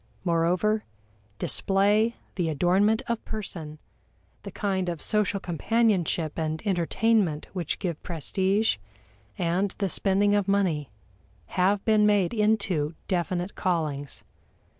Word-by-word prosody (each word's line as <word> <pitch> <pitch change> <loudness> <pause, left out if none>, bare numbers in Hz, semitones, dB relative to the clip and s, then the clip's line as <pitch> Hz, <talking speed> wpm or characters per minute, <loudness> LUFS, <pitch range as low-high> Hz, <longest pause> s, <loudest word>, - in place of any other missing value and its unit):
Moreover, 180 +5 +1 0.5
display, 205 +4 +2 0.2
the 175 -4 -1
adornment 190 +8 +2
of 235 -1 -2
person, 170 -8 -6 0.6
the - - -7
kind 190 -3 -1
of 170 -2 -4
social 210 +1 +1
companionship 175 -4 0
and 160 0 -1
entertainment 190 -2 +1
which 180 -3 -2
give 170 -4 -4
prestige, 190 - 0 0.6
and 180 +3 +1
the 195 -2 -1
spending 200 +3 +2
of 205 -2 +1
money, 180 - +1 0.6
have 195 +2 +2
been 215 -1 +4
made 205 -3 +2
into 205 -8 +1
definite 180 +1 -1
callings. 155 -6 -2
190 Hz, 110 wpm, -26 LUFS, 170-205 Hz, 0.6 s, been